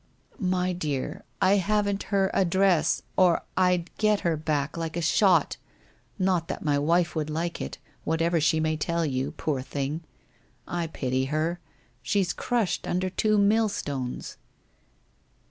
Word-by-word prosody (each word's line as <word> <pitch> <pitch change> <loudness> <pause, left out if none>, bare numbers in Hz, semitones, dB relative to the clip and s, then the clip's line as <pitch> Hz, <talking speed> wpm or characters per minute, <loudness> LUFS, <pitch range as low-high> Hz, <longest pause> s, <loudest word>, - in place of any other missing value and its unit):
' - - -28 0.2
My 180 0 0
dear, 155 +2 -3 0.2
I 195 +2 +5
haven't 200 0 +1
her 195 -1 +2
address, 190 -2 +2
or 180 -2 +4
I'd 180 -2 +1
get 215 -1 +3
her 170 -2 +1
back 150 -2 -1
like 165 0 -4
a - - +1
shot 170 0 +3 0.3
— - - -31 0.2
not 185 -3 +1
that 180 - -5
my 145 -1 +2
wife 170 +3 +2
would 155 -1 -1
like 170 +3 -3
it, 65 - -5 0.3
whatever 165 +1 +1
she 160 +1 +3
may 155 0 0
tell 170 +2 0
you, 130 -2 -1
poor 140 -4 -2
thing! 140 +4 -3 0.7
I 175 -1 -2
pity 130 -4 -1
her. 155 +5 -1 0.4
She's 190 +4 0
crushed 235 -6 -1
under 185 +1 -1
two 215 +3 +2
millstones.' 200 - 0
170 Hz, 145 wpm, -27 LUFS, 155-190 Hz, 0.7 s, I